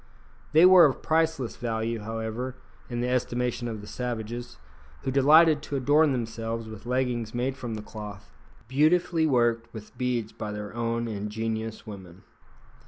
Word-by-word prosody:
They 160 +3 +7
were 185 -2 +9
of 140 - 0
priceless 160 -6 0
value, 115 -1 -2
however, 115 +4 -4 0.3
in 120 -1 -2
the 125 - 0
estimation 125 -1 -1
of 110 -3 -5
the 105 - -11
savages, 120 +1 -5 0.5
who 135 - -1
delighted 150 +3 +6
to 145 - -5
adorn 145 +3 +4
themselves 115 -2 -3
with 110 +1 -10
leggings 125 -3 -1
made 130 +2 -1
from 120 -4 -5
the 105 - -6
cloth, 105 -2 -9 0.4
beautifully 160 +4 +3
worked 120 -3 +1
with 105 -1 -10
beads 120 -3 -1
by 105 -1 -6
their 105 0 -6
own 115 0 -1
ingenious 110 +1 -4
women. 95 -4 -10
120 Hz, 150 wpm, -27 LUFS, 110-130 Hz, 0.5 s, were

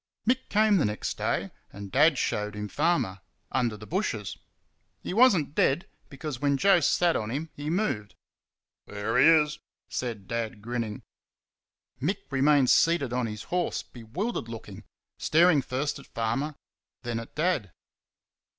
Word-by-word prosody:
Mick 260 +2 +1
came 210 0 +4
the 165 - +2
next 105 0 -2
day, - - -1 0.2
and 100 -1 -9
Dad 145 +2 +5
showed 105 -2 -1
him 105 0 -4
Farmer, 150 - 0 0.3
under 120 -4 0
the 105 - -10
bushes. 120 - -2 0.7
He - - -4
was 230 -2 +6
n't 145 -2 -3
dead, 150 +1 +2 0.2
because 140 -2 -6
when 140 -1 +2
Joe 195 +4 +5
sat 170 +1 +2
on 105 - -2
him 150 +6 -4
he 145 +1 -5
moved. 155 - -1 0.7
"There 105 +3 -1
he - - +7
is," 150 -2 +4 0.3
said 115 -6 -4
Dad, 115 -2 -3
grinning. 115 -1 -4 1.0
Mick 185 +9 0
remained 135 -1 +4
seated 155 -7 +3
on 125 -2 0
his 105 0 -6
horse, 180 0 -1
bewildered 125 - -4
looking, 110 -2 -9 0.3
staring 165 -2 +4
first 135 +3 -2
at - - -14
Farmer, 120 +7 -2 0.5
then 120 -1 -2
at 115 - -10
Dad. 155 - 0
135 Hz, 150 wpm, -27 LUFS, 110-165 Hz, 1.0 s, he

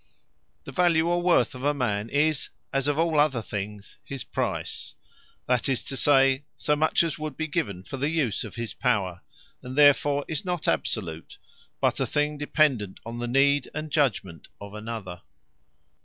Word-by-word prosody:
Worth - - -43
The - - -8
Value, 170 -2 +3
or 175 0 +1
WORTH 175 -9 +3
of 130 0 -9
a 145 +1 +2
man, 110 -5 -1
is 150 +2 +1 0.2
as 135 0 +1
of 145 0 +1
all 160 -2 +2
other 135 -6 +2
things, 105 0 -6
his 135 -3 -6
Price; - - -4 0.5
that 125 +1 +1
is 130 - 0
to 135 - -5
say, 135 -1 +4
so 150 - +1
much 155 +3 +3
as 165 -3 -3
would 155 -3 -5
be 160 - -1
given 100 - -2
for 135 - -7
the 140 +3 0
use 150 -10 0
of - - -9
his 115 -2 -4
Power: 95 -8 0 0.4
and 125 +1 -7
therefore 145 0 +4
is 155 -3 -3
not 180 -3 -3
absolute; 85 -7 -2 0.4
but - - +1
a - - 0
thing 150 0 0
dependant 140 -9 +1
on 115 +1 -6
the 120 - -2
need 140 +2 +3
and 155 0 -4
judgement 105 - 0
of 100 0 -9
another. 105 -5 -6
135 Hz, 180 wpm, -26 LUFS, 110-150 Hz, 0.5 s, say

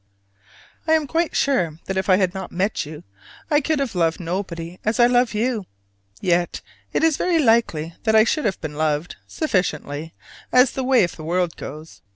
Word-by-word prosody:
I 320 - +4
am 315 -2 +3
quite 330 +3 -1
sure 180 - +1
that 190 - -3
if 190 +1 -1
I 185 - +7
had 185 -1 +1
not 190 - -6
met 190 -3 -1
you, 150 0 -9 0.5
I 295 0 +4
could 310 +2 0
have 275 -4 -2
loved 165 -3 +1
nobody 175 -1 -4
as 215 +2 0
I 240 - +7
love 245 -2 +2
you. 220 -2 -1 0.5
Yet 175 -2 0 0.3
it - - 0
is 320 -3 +3
very 355 -2 +1
likely 225 - +2
that 220 -1 +2
I 220 - +8
should 300 +4 0
have 195 -4 0
loved 155 +1 -2
sufficiently, 160 - -2 0.4
as 250 0 +5
the 265 - -3
way 255 -4 +4
of 175 - -2
the 155 - -8
world 175 +1 0
goes. 155 +3 -9
190 Hz, 190 wpm, -22 LUFS, 165-250 Hz, 0.5 s, I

